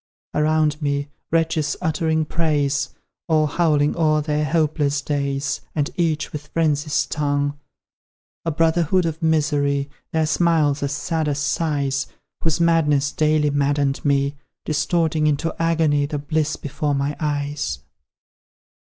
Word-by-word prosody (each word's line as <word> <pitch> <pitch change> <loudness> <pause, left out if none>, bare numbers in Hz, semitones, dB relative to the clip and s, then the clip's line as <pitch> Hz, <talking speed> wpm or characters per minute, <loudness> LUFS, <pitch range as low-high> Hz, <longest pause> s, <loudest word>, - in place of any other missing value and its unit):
Around 155 0 +1
me, 145 0 -1 0.2
wretches 160 -2 +1
uttering 160 -1 0
praise, 145 -3 0 0.4
Or 155 -1 +3
howling 150 -2 +2
o'er 155 -2 +3
their 150 0 0
hopeless 150 -2 +1
days, 140 -1 -2
And 145 -2 0
each 160 -3 -1
with 150 -1 -6
Frenzy's 150 -2 +1
tongue; 145 -1 -1 0.8
A 165 - -1
brotherhood 165 +2 +2
of 165 0 -3
misery, 145 -3 +1 0.2
Their 160 -1 +1
smiles 155 -3 +2
as 140 -1 -1
sad 155 +2 -1
as 145 -1 0
sighs; 140 -2 0 0.4
Whose 165 0 +1
madness 150 -4 +3
daily 155 -1 +2
maddened 140 -1 +1
me, 140 -1 +2 0.3
Distorting 155 0 +1
into 150 +2 0
agony 160 -3 +2
The 150 - -3
bliss 150 +1 -1
before 145 +1 -2
my 140 +1 -1
eyes! 145 - -2
150 Hz, 125 wpm, -22 LUFS, 145-160 Hz, 0.8 s, Or